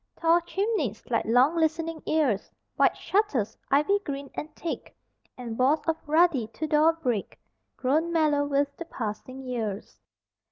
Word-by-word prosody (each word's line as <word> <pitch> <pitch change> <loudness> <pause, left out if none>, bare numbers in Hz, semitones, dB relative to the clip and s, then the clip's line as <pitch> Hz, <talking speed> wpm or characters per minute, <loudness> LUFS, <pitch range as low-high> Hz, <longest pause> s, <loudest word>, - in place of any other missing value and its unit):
Tall 335 +1 +4
chimneys, 345 - -2
like 230 - +1
long 250 +8 +4
listening 325 0 0
ears, 280 -11 +1 0.3
White - - +3
shutters, 370 - 0
ivy 300 +9 +3
green 280 -3 -5
and 300 - -5
thick, 335 - -6 0.4
And 235 -2 -6
walls 275 +5 +3
of 325 - +1
ruddy 310 -6 +3
Tudor 305 +6 +2
brick 250 -11 -3 0.4
Grown 310 +6 +1
mellow 305 -3 +2
with 285 0 0
the 340 - -6
passing 255 0 -6
years. 225 -6 -4
290 Hz, 135 wpm, -27 LUFS, 250-330 Hz, 0.4 s, Tall